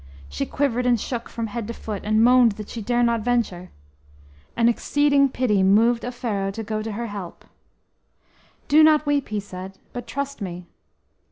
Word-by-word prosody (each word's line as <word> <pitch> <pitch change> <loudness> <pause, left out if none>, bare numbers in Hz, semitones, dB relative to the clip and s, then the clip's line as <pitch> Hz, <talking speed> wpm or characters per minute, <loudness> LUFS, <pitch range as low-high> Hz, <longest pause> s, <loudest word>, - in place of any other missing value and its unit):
She 70 +1 -4
quivered 250 -3 0
and 240 -2 +3
shook 235 +1 -5
from 230 - -4
head 225 0 -5
to 235 - -6
foot, 210 -3 -6
and 215 +1 +2
moaned 245 -2 +5
that 210 0 -9
she 230 - -6
dare 240 +3 +1
not 235 -1 +1
venture. 210 -7 -1 0.9
An 230 0 +4
exceeding 280 +3 +2
pity 235 -6 +1
moved 225 +5 +4
Offero 225 -5 -3
to 225 - -5
go 215 0 -3
to 220 0 -5
her 235 +3 -4
help. 200 -5 -8 1.2
"Do 305 +2 +6
not 310 -1 +5
weep," 290 -2 0
he 210 -1 -2
said, 190 -1 -9 0.2
"but 245 -1 -6
trust 280 +3 -4
to - - -5
me." 180 -1 -6
230 Hz, 180 wpm, -23 LUFS, 205-245 Hz, 1.2 s, Do